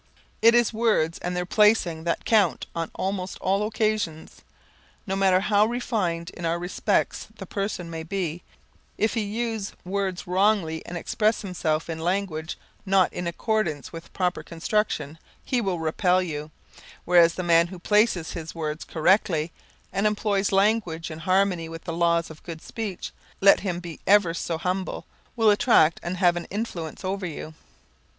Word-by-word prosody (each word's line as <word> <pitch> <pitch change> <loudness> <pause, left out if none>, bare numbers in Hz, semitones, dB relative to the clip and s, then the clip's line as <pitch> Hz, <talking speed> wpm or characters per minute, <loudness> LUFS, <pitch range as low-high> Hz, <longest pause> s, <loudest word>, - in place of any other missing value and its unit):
It 230 +2 +7
is 240 -1 +3
words 215 -8 +1
and 180 0 -3
their 180 - -1
placing 180 -5 +3
that 170 - -1
count 215 -3 +3
on 165 -1 -3
almost 190 -1 -3
all 195 +3 0
occasions. 215 -7 -2 0.6
No 195 -2 -2
matter 190 -1 +3
how 210 +1 +3
refined 195 -8 -2
in 175 - -10
other 165 0 +1
respects 175 +1 -1
the - - -7
person 195 -3 -3
may 165 -1 -5
be, 175 -1 -3 0.6
if 220 - +1
he 230 - 0
use 220 0 -3
words 190 -1 -2
wrongly 180 -3 +1
and 175 - -5
express 215 +5 0
himself 160 -5 -1
in 165 -1 -4
language 175 -2 -2 0.3
not 195 -2 +3
in 180 -1 -3
accordance 170 - -1
with 165 0 -8
a - - -26
proper 180 -1 -1
construction, 165 -3 -2 0.3
he 250 -3 0
will 190 -5 -1
repel 180 +3 +2
you, 155 -4 -4 0.6
whereas 170 -1 +5
the 185 - -3
man 170 -1 +4
who 185 +1 -9
places 205 -3 +2
his 165 -1 -7
words 155 -1 -3
correctly 165 -1 +2 0.4
and 200 +2 +2
employs 205 -2 0
language 195 -5 +1
in 155 - -7
harmony 185 -1 +1
with 165 0 -8
the 170 - -4
laws 170 -1 +1
of 155 - -13
good 165 -2 -8
speech, 210 -5 -5 0.3
let 195 0 +6
him 180 -3 -3
be 170 -2 -8
ever 200 -4 +5
so 170 -1 -3
humble, 185 +3 -3 0.3
will 225 -3 +5
attract 205 - +4
and 180 +2 -4
have 175 -2 +4
an 175 - -4
influence 190 -6 -5
over 190 0 -2
you. 155 -1 -7
180 Hz, 165 wpm, -25 LUFS, 165-205 Hz, 0.6 s, It